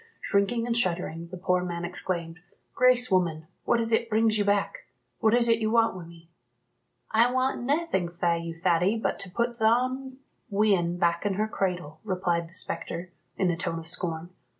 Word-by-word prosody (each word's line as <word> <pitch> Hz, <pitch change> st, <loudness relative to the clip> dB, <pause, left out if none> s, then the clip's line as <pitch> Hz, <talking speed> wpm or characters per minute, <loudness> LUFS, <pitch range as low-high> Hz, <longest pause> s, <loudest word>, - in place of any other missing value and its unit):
Shrinking 225 Hz, +4 st, +1 dB
and 235 Hz, -1 st, -1 dB
shuddering, 170 Hz, -6 st, -1 dB
the 185 Hz, +2 st, -8 dB
poor 180 Hz, 0 st, +1 dB
man 175 Hz, -1 st, -3 dB
exclaimed, 175 Hz, -1 st, -4 dB, 0.3 s
"Grace, 250 Hz, -2 st, +4 dB
woman, 170 Hz, -4 st, +1 dB, 0.2 s
what 235 Hz, -, +3 dB
is 230 Hz, 0 st, -1 dB
it 230 Hz, +1 st, +2 dB
brings 220 Hz, 0 st, +3 dB
you 210 Hz, -, +2 dB
back? 200 Hz, 0 st, 0 dB, 0.3 s
What 220 Hz, +1 st, +4 dB
is 240 Hz, -1 st, +4 dB
it 230 Hz, -1 st, +3 dB
you 215 Hz, -1 st, 0 dB
want 230 Hz, 0 st, +3 dB
wi' 180 Hz, -2 st, -8 dB
me?" 165 Hz, 0 st, -15 dB, 0.8 s
"I 230 Hz, +2 st, +4 dB
want 255 Hz, +1 st, 0 dB
naething 275 Hz, -, 0 dB
fae 170 Hz, 0 st, 0 dB
you, 165 Hz, 0 st, -6 dB
Thady, 180 Hz, +5 st, +2 dB
but 220 Hz, -, -2 dB
to 195 Hz, -, -5 dB
put 235 Hz, +5 st, -2 dB
thon 255 Hz, +4 st, +1 dB, 0.3 s
wean 195 Hz, -5 st, +2 dB
back 170 Hz, -1 st, +1 dB
in 205 Hz, -2 st, 0 dB
her 215 Hz, +2 st, 0 dB
cradle," 180 Hz, -7 st, -3 dB
replied 180 Hz, -4 st, -1 dB
the 170 Hz, -, -14 dB
spectre, 170 Hz, +1 st, -4 dB, 0.3 s
in 185 Hz, -2 st, +2 dB
a -, -, -1 dB
tone 165 Hz, 0 st, -3 dB
of 165 Hz, -, -7 dB
scorn. 170 Hz, 0 st, -3 dB
190 Hz, 185 wpm, -27 LUFS, 170-230 Hz, 0.8 s, Grace